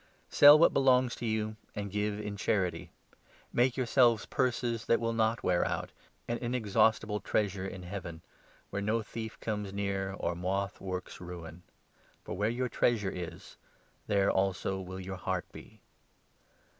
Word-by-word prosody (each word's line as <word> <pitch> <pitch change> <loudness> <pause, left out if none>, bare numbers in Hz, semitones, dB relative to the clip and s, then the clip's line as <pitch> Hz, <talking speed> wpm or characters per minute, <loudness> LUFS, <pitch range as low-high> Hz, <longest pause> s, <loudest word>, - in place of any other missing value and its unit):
Sell 145 +1 +9
what 165 - +5
belongs 130 -2 +4
to 120 - -4
you, 110 0 -1 0.2
and 100 -1 -4
give 105 +1 0
in - - -5
33 - - -7
The 105 0 -4
true 100 - -6
charity. 100 -4 -1 0.6
Make 125 +1 +2
yourselves 120 -3 +3
purses 120 -2 -1
that 115 - +3
will 115 0 -1
not 110 0 +2
Treasure, - - -9
wear - - +3
out - - -3 0.2
— - - -39
an 120 0 -2
inexhaustible 110 -3 +1
treasure 100 -3 -1
in 95 -2 -7
Heaven, 90 -3 -7 0.5
where 100 - -2
no 110 +2 0
thief'comes 110 -2 -5
near, 100 -1 -2
or 85 -3 -2
moth 95 +3 -2
works 95 -2 -5
ruin. 85 -1 -8 0.6
For - - -5
where 105 +3 +1
your 125 +2 -1
34 - - -12
treasure 105 -5 +2
is, 90 -2 -8 0.5
there 100 -1 +3
also 95 0 0
will 95 0 -7
your 95 0 -6
heart 95 0 -2
be. - - -13
105 Hz, 170 wpm, -31 LUFS, 95-115 Hz, 0.6 s, Sell